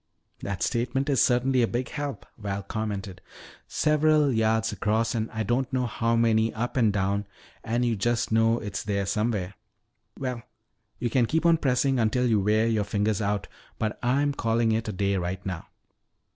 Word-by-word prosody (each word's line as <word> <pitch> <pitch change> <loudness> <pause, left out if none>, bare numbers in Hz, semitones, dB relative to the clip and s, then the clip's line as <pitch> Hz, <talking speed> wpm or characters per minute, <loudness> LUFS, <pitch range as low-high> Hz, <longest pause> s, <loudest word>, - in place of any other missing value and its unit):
"That 100 -3 -3
statement 130 +4 0
is 135 - +3
certainly 125 +1 +3
a 115 - +3
big 125 +2 -2
help," 145 -2 -5
Val 100 -2 -4
commented. 100 -3 -4 0.5
"Several 150 -1 +3
yards 110 0 +1
across 110 +3 0
and 115 -1 -2
I 110 0 -3
don't 120 +5 0
know 130 -1 0
how 115 0 0
many 115 -1 +3
up 120 +2 -3
and 115 -5 +3
down 100 +1 -1 0.4
and 120 +2 0
you 120 -1 +1
just 120 +3 0
know 115 +1 +3
it's 105 -5 -4
there 100 -1 -1
somewhere. 105 -3 -1 0.6
Well, 125 -3 -3 0.6
you 120 -1 -2
can 120 -2 +3
keep 160 +5 0
on 170 -1 +5
pressing 135 -2 +1
until 120 +3 +2
you 110 -4 +3
wear 105 +3 +2
your 110 -2 +1
fingers 105 +1 0
out, 100 -1 -1 0.3
but 110 -1 -2
I'm 140 +4 +1
calling 115 -2 +1
it 110 +1 -1
a - - -1
day 100 0 0
right 90 +2 -3
now." 90 -4 -5
115 Hz, 175 wpm, -26 LUFS, 105-125 Hz, 0.6 s, on